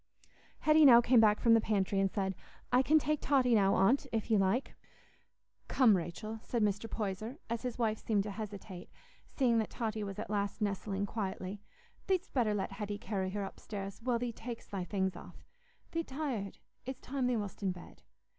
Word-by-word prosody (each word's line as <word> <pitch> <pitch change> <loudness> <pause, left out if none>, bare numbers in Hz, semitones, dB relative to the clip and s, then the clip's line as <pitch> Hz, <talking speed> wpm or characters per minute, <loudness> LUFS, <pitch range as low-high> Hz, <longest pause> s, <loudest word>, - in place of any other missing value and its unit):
Hetty 310 0 +5
now 245 -5 +9
came 240 0 +5
back 215 -1 +5
from 230 - +5
the 225 - +5
pantry 200 -2 0
and 195 0 +2
said, 190 -1 -1 0.4
"I 250 +1 +5
can 305 +4 +4
take 305 0 0
Totty 260 -4 +3
now, 195 -3 +4
Aunt, 215 +9 +3
if 225 0 -2
you 215 - +5
like." 195 +7 +1 0.9
"Come, 240 -6 +5
Rachel," 215 +6 -4
said 235 -2 -1
Mr. 210 +2 0
Poyser, 215 +5 -4
as 235 -1 -1
his 250 -2 -4
wife 220 -3 0
seemed 205 -3 +1
to 210 - -5
hesitate, 195 -3 -7 0.4
seeing 240 -4 +2
that 220 - -1
Totty 220 -3 -3
was 200 -1 -5
at - - -5
last 205 0 -1
nestling 200 -1 -1
quietly, 195 -1 -4 0.5
"thee'dst 380 0 0
better 225 -5 +2
let 195 - -2
Hetty 205 -1 -4
carry 200 -3 -3
her 200 +1 -3
upstairs, 195 +1 -7
while 245 0 +1
thee 240 0 -3
tak'st 230 +1 -8
thy 195 -3 -2
things 190 -1 -1
off. - - -12 0.5
Thee't 330 0 -2
tired. 260 -8 -4 0.3
It's 260 +1 -6
time 260 -1 -2
thee 250 -2 +1
wast 205 -2 -5
in 195 -2 +1
bed. 180 -1 -11
215 Hz, 190 wpm, -33 LUFS, 195-245 Hz, 0.9 s, now